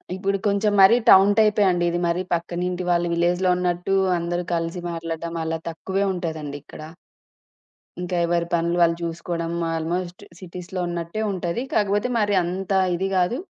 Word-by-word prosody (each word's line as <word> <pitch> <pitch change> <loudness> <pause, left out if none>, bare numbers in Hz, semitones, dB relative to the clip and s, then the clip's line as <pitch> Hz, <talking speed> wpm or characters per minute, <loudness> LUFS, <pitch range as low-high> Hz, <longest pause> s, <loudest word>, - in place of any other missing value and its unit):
ఇప్పుడు 195 +1 -1
కొంచెం 205 +1 +1
మరీ 195 +5 +7
టౌన్ 195 +1 +8
టైపే 210 -1 +4
అండి. 175 -1 0
ఇది 175 - -1
మరీ 170 +2 0
పక్కనింటి 175 +1 -2
వాళ్ళు 175 0 +1
విలేజ్‌లో 175 +2 +1
ఉన్నట్టు 180 +1 -1 0.2
అందరు 175 +1 -2
కలిసి 165 +1 -2
మాట్లాడ్డం 165 0 -5
అలా 165 0 -2
తక్కువే 190 +4 -2
ఉంటదండి 160 -5 -4
ఇక్కడ. - - -12 1.2
ఇంక 180 0 -5
ఎవరి 170 0 0
పనులు 170 +1 +1
వాళ్ళు 170 -1 +4
జూసుకోవడం 170 0 -3 0.2
ఆల్‌మోస్ట్ 175 +2 -3 0.2
సిటీస్‌లో 180 0 -6
ఉన్నట్టే 170 +4 -4
ఉంటది. 180 +3 -3
కాకపోతే 205 +2 +1
మరి 205 -1 +1
అంత 185 +3 -4 0.2
ఇది 190 +3 -1
గాదు. 185 +6 +1
175 Hz, 145 wpm, -23 LUFS, 170-190 Hz, 1.2 s, టౌన్